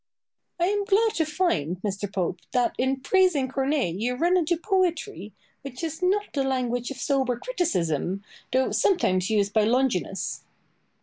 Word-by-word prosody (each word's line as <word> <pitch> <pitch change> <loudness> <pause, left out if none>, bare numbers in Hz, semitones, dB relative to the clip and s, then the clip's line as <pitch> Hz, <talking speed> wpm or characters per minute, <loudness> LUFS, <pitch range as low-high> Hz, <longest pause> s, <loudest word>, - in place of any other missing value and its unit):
Boileau. 350 +1 +2
I - - 0
am 410 -1 -1
glad 440 +2 +3
to 325 -6 +1
find, 295 - 0
Mr. 200 -1 -3
Pope, 185 -2 -2
that 245 -1 +2
in 265 +1 0
praising 360 -6 +3
Corneille 270 - 0
you 235 +7 -1
run 345 +7 +2
into 345 -1 +2
poetry, 340 - -1 0.3
which 270 +2 -8
is 320 +1 -4
not 390 +3 +2
the 275 - 0
language 245 -2 -1
of 275 - -6
sober 260 -2 0
criticism, 195 - -1 0.3
though 260 +1 +2
sometimes 185 - +2
used 205 -2 +1
by 220 - +4
Longinus. 220 -5 0
265 Hz, 160 wpm, -25 LUFS, 210-345 Hz, 0.3 s, by